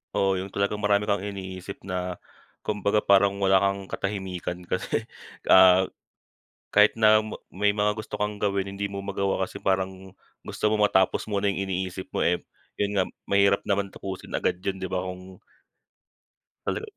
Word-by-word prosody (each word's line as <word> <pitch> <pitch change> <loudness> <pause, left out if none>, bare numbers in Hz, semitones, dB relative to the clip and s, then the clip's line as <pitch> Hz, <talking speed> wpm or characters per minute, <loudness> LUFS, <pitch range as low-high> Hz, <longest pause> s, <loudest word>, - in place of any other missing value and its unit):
Oo, 95 -1 +2
yung 95 - -4
talagang 100 +1 -1
marami 105 -1 +2
kang 100 -1 +1
iniisip 95 -1 -7
na 90 -1 -3 0.5
kumbaga 105 0 0
parang 100 0 +4
wala 95 0 +5
kang 100 0 0
katahimikan 95 -3 -4
kasi, 95 +5 -2 0.5
ah, 95 0 +8 0.9
kahit 105 +1 +5
na 110 0 +6 0.2
may 105 +2 +1
mga 105 0 +1
gusto 110 - -6
kang 105 0 -1
gawin, 100 -1 0
hindi 100 +1 -2
mo 100 - -4
magawa 100 0 -1
kasi - - -9
parang 95 0 -1 0.3
gusto 105 - -1
mo 105 - +2
matapos 95 -2 +3
muna 100 0 +1
yung 95 -1 0
iniisip 95 0 -4
mo - - -2
eh, 90 0 +1 0.3
yun 100 0 -1
nga, - - +4 0.2
mahirap 100 0 +3
naman 100 -1 0
tapusin 95 -1 -7
agad 90 - 0
yun, 95 0 -4
di 95 - -4
ba, 90 - 0
kung 90 0 -9 1.3
Hello. - - -1
100 Hz, 160 wpm, -26 LUFS, 95-100 Hz, 1.3 s, ah